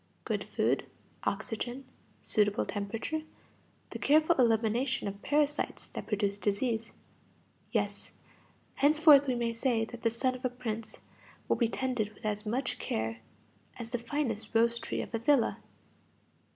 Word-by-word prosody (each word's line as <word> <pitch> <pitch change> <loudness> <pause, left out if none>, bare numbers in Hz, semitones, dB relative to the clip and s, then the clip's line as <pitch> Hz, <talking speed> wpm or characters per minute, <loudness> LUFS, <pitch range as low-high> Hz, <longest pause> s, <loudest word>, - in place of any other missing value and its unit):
Good - - -1
food, - - 0 0.4
oxygen, 240 +5 -3 0.4
suitable 205 -1 +2
temperature, 220 +10 -3 0.7
the - - -5
careful 310 +3 +4
elimination 235 +1 +2
of 200 0 -6
parasites 295 0 0
that - - -6
produce 205 -1 0
disease; 220 +3 -1 0.8
yes, - - -2 0.6
henceforth 295 -1 +6
we 255 - +1
may 235 -1 0
say 230 -1 +1
that 235 +1 -10
the 230 - +3
son 255 +3 0
of 255 +1 -9
a 255 - +2
prince 230 -3 -5 0.5
will - - +3
be 235 - +3
tended 230 -4 -2
with - - -13
as 210 0 -2
much 250 +2 -1
care 110 +1 -2 0.6
as 235 -1 -7
the 245 - -1
finest 230 -3 -2
rose 235 +1 +4
tree - - -3
of - - -11
a 225 - 0
villa. 255 +1 +3
235 Hz, 140 wpm, -31 LUFS, 215-260 Hz, 0.8 s, henceforth